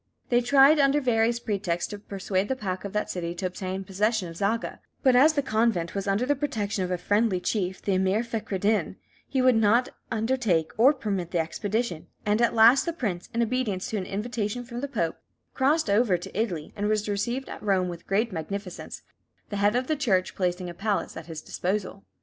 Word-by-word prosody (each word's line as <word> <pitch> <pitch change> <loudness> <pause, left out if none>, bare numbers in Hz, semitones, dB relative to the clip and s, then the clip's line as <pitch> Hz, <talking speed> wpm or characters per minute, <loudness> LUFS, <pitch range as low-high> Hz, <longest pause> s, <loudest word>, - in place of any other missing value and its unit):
They 240 0 +4
tried, 275 +4 +6
under 280 +1 +4
various 235 -3 +2
pretexts, 195 -6 -2
to 205 - -6
persuade 195 -1 -2
the 265 - -1
pacha 195 -4 -4
of 195 - -12
that 210 - -1
city 170 -1 -4
to 185 - -4
obtain 185 +1 -4
possession 200 +1 0
of 165 - -10
Zaga; 210 +5 -1 0.2
but 260 -3 +5
as 295 +5 +6
the 285 -2 0
convent 215 -8 +1
was 200 0 -3
under 200 +5 +1
the 290 +2 +2
protection 220 -9 -2
of 180 - -3
a 180 - 0
friendly 205 +1 +1
chief, 185 -1 -2
the 200 - +1
Emir 190 +4 +2
Fechraddin, 215 -2 -1 0.3
he 265 -2 0
would 255 -2 +5
not 225 +3 +3 0.2
undertake 220 -8 +1
or 245 +6 +6
permit 200 -9 -3
the 175 - -1
expedition; 180 +3 -2 0.2
and 210 +2 +2
at 235 - +2
last 230 +4 +7
the 335 - 0
prince, 200 - -3
in 235 0 +1
obedience 225 -6 -2
to 220 - -1
an 185 - -4
invitation 215 +2 -3
from 240 0 -7
the 285 - -2
Pope, 170 - -2 0.3
crossed 295 +3 +2
over 205 -2 +3
to 175 - -10
Italy, 185 -8 -2
and 205 0 -1
was 215 -1 0
received 235 +6 -2
at - - -8
Rome 190 -3 +1
with 175 -1 -8
great 215 +4 +1
magnificence, 185 +2 -6 0.5
the 205 - -3
head 205 +2 +3
of 250 +1 +1
the 310 - 0
Church 200 -11 +1
placing 180 -1 -1
a 175 - -6
palace 200 +3 -2
at 165 0 -8
his 160 -2 -7
disposal. 195 +1 -3
210 Hz, 205 wpm, -26 LUFS, 185-240 Hz, 0.5 s, last